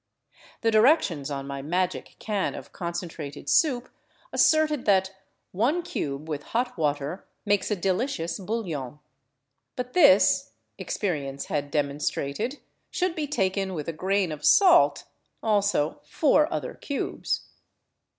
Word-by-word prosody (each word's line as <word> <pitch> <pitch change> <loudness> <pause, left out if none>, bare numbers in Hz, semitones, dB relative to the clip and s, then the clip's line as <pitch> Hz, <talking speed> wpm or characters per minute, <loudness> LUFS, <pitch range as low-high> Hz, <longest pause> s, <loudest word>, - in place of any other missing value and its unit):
The 225 - +2
directions 215 - +3
on 135 -1 -4
my 140 0 -5
magic 180 +5 -2
can 205 -3 -2
of - - -10
concentrated 170 -5 -6
soup 255 - +3 0.5
asserted 310 -3 +3
that 190 -2 +3 0.2
" - - -49
one 265 - +1
cube 145 - -4
with 150 -2 -3 0.2
hot 245 +1 -1
water 150 +2 -2 0.2
makes 205 -1 +1
a 210 - +1
delicious 185 -2 -1
bouillon." 175 - -4 0.8
But 250 0 -5
this, 285 -6 +5 0.3
experience 140 -8 -3
had 145 -1 -2
demonstrated, 145 - -2 0.3
should 365 -1 -1
be 310 -3 -3
taken 190 -7 -1
with 150 -3 -5
a 165 - -2
grain 190 +1 0
of 150 -1 -7
salt 360 -4 +5 0.2
— - - -47
also 200 -8 +1
four 300 +1 +2
other - - -3
cubes. 285 - -3
190 Hz, 130 wpm, -26 LUFS, 150-245 Hz, 0.8 s, this